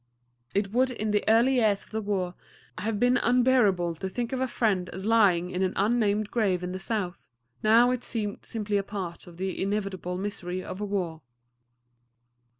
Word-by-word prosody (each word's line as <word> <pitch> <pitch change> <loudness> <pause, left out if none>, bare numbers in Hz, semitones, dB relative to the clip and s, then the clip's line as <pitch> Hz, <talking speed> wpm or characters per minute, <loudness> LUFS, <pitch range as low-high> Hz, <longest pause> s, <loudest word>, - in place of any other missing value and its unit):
It 200 0 0
would 255 +3 +3
in 215 -4 -2
the 210 0 +2
early 235 +4 +4
years 210 -4 +2
of - - -23
the 220 0 -2
war 190 -4 -1 0.5
have 210 +1 -2
been 245 +1 +4
unbearable 240 -9 +3
to 190 +3 -4
think 240 +5 -3
of 260 - -1
a 260 - +1
friend 195 -7 0
as 190 +2 -6
lying 195 -6 +3
in 180 - -2
an 185 -1 +1
unnamed 210 0 +1
grave 195 -6 +1
in 180 - -3
the 185 - -4
South; 195 -3 -4 0.3
now 230 +3 +5
it 250 -1 -2
seemed 210 -3 -3
simply 210 -2 -1
a 200 - 0
part 190 -4 -6
of 170 -1 -13
the 190 0 -3
inevitable 195 -3 -2
misery 185 -2 -4
of 185 - -7
war. 185 -6 -2
205 Hz, 180 wpm, -27 LUFS, 185-225 Hz, 0.5 s, now